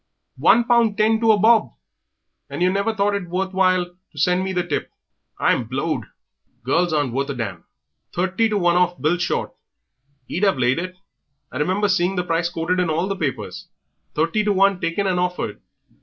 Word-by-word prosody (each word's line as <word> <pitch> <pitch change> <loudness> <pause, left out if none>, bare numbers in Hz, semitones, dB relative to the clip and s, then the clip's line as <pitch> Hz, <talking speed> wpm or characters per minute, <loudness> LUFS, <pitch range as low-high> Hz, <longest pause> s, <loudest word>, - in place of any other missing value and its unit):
One 240 - +5
pound 235 -3 +2
ten 220 +1 +3
to 225 -1 +5
a 215 - +4
bob! 220 +2 +4 0.8
And 175 - -2
yer 180 - +3
never 200 +3 0
thought 205 0 +1
it 195 -4 -3
worth 190 +2 -2
while 185 -1 +3
to 175 -3 -24
send 180 +5 +2
me 190 - -2
the 180 -1 -1
tip. - - -3 0.5
I'm 120 - +1
blowed! 135 +7 -2 0.6
Girls 170 +7 +1
aren't 145 -6 0
worth 140 +2 -1
a 140 - -3
damn.... 100 -8 -5 0.5
Thirty 190 +5 0
to 210 - 0
one 175 -2 +2
off 180 0 +1
Bill 160 +4 +1
Short 170 - -2 0.7
he'd 180 - -3
have 195 -8 +3
laid 125 +3 +2
it. 185 +1 -5 0.6
I 130 - -5
remember 185 +7 +1
seeing 185 0 +1
the 180 - 0
price 170 0 0
quoted 175 +2 -1
in 180 -2 +1
all 160 +3 0
the 195 - -2
papers. 155 -8 -4 0.5
Thirty 165 +7 +1
to 210 - +1
one 195 -1 +3
taken 170 +4 -1
and 185 -2 +1
hoffered. 180 -13 -2
180 Hz, 190 wpm, -21 LUFS, 165-200 Hz, 0.8 s, One